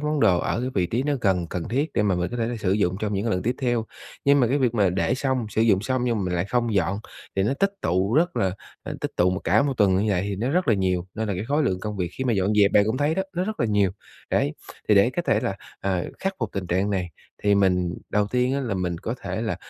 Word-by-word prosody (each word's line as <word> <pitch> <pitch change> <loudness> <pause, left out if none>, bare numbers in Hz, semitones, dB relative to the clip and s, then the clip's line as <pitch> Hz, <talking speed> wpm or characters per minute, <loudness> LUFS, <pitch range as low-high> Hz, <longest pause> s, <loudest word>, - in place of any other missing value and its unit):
món 150 -1 -1
đồ 95 -6 +4
ở 125 +2 -1
vị 90 -3 +2
trí 120 +7 -1
nó 145 0 0
gần, 90 -5 +1
cần 85 0 -5
thiết 140 +6 -1
để - - +2
mà 100 -3 +2
mình 90 +3 -1
có 120 - -4
thể 115 -1 0
là 120 0 -3
sử 95 -3 0
dụng 95 -3 +1
trong 105 -1 -1
những 100 +3 -1
cái 115 - 0
lần 90 -2 0
tiếp 125 +3 0
theo. 120 -4 0 0.4
Nhưng 140 0 +5
mà 120 - +4
cái 140 +5 +1
việc 125 -3 +1
mà 100 -5 +3
để 95 +7 +1
xong, 130 -3 -1
sử 110 - +1
dụng 100 -4 +4
xong 130 +1 0
nhưng 120 -2 +1
mà - - -1
mình 90 -1 -1
lại 85 - 0
không 115 +1 0
dọn 95 +1 +1 0.4
thì 95 - +3
nó 115 +7 +1
tích 195 +6 +1
tụ 95 +6 +1
rất 175 +3 +2
là, 95 -1 +1 0.3
à, - - -6
tích - - -2
tụ 90 +1 +3
mà 95 - -1
cả 105 +8 +4
một 140 -2 0
tuần 100 -4 +4
như 105 +2 +1
vậy 90 0 +1
thì 100 -1 -3
nó 120 +6 -1
rất 180 0 +1
là 110 - +5
nhiều, 90 -2 0
nên 110 -1 -2
là 100 - -1
cái 95 - -3
khối 145 +5 +1
lượng 95 -8 0
công 105 -1 -4
việc 90 -2 -2
khi 130 - -4
mà 125 - +2
dọn 100 0 +1
dẹp 100 -1 +4
bạn 100 - +5
cũng 110 - 0
thấy 145 +3 +1
đó, 190 - 0
nó 180 - 0
rất 215 +2 -4
là 115 - +2
nhiều. 100 -3 +2 0.4
Đấy, 75 - +1 0.4
thì - - +6
để - - +5
có - - -2
thể - - +2
là, - - -2 0.2
à, 95 -3 -1
khắc 195 0 -2
phục - - -2
tình 95 -2 -3
trạng 95 +4 0
này 90 -3 -1 0.3
thì 105 0 +4
mình 90 -3 +2 0.2
đầu 105 0 +2
tiên 125 +4 +1
á 140 - 0
là 115 -7 -2
mình 90 -2 -2
có - - -3
thể - - -3
là - - -2
105 Hz, 305 wpm, -24 LUFS, 95-125 Hz, 0.4 s, thì